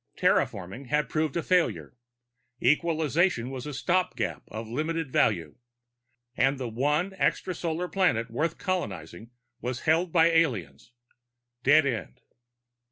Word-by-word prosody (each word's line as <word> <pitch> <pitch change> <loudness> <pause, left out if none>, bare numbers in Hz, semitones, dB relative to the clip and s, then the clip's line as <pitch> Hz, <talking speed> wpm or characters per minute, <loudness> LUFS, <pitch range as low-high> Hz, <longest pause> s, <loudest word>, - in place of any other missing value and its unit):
Terraforming 100 +8 0
had 150 -1 0
proved 155 -1 -1
a 170 - -1
failure, 180 -7 +1 0.6
equalization 155 -2 +1
was 130 0 -6
a - - -4
stopgap 180 +5 0
of 110 +1 -7
limited 155 +4 -2
value, 85 -13 +1 0.8
and 135 +2 +2
the 130 -2 -4
one 150 - 0
extrasolar 175 -2 -1
planet 175 - +1
worth 155 +7 -1
colonizing 110 - -4 0.3
was 125 0 -3
held 165 +2 +2
by 165 -1 +5
aliens. 115 - 0 0.7
Dead 145 +4 +5
end. 110 - -3
145 Hz, 115 wpm, -27 LUFS, 115-165 Hz, 0.8 s, by